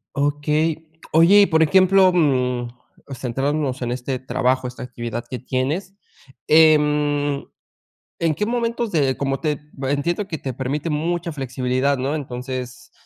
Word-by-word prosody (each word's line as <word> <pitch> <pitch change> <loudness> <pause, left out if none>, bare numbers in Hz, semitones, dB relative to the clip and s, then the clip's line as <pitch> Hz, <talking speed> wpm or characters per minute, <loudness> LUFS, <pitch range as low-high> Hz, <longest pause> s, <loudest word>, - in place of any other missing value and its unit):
Okey. 150 +3 0 0.3
Oye, 170 +6 +7
y - - +6
por 160 -4 +2
ejemplo, 185 +3 +5
mm, 125 -7 +1 0.4
centrándonos 135 +2 -2
en 120 - -2
este 130 +1 -3
trabajo, 130 0 0
esta 125 0 -8
actividad 120 -1 -5
que 125 - -5
tienes, 140 +10 -2 0.5
em, 150 -2 +3 0.8
¿en 165 -2 +1
qué 210 - -1
momentos 235 -1 -1
de? 135 -4 +1
como 135 -1 -1
te 150 -3 -1 0.2
entiendo 170 +9 -1
que 160 - -4
te 130 -2 -5
permite 140 +5 -3
mucha 170 +3 -2
flexibilidad, 130 +1 -1
¿no? 135 +4 -1
Entonces 125 -2 -6
145 Hz, 135 wpm, -21 LUFS, 130-160 Hz, 0.8 s, Oye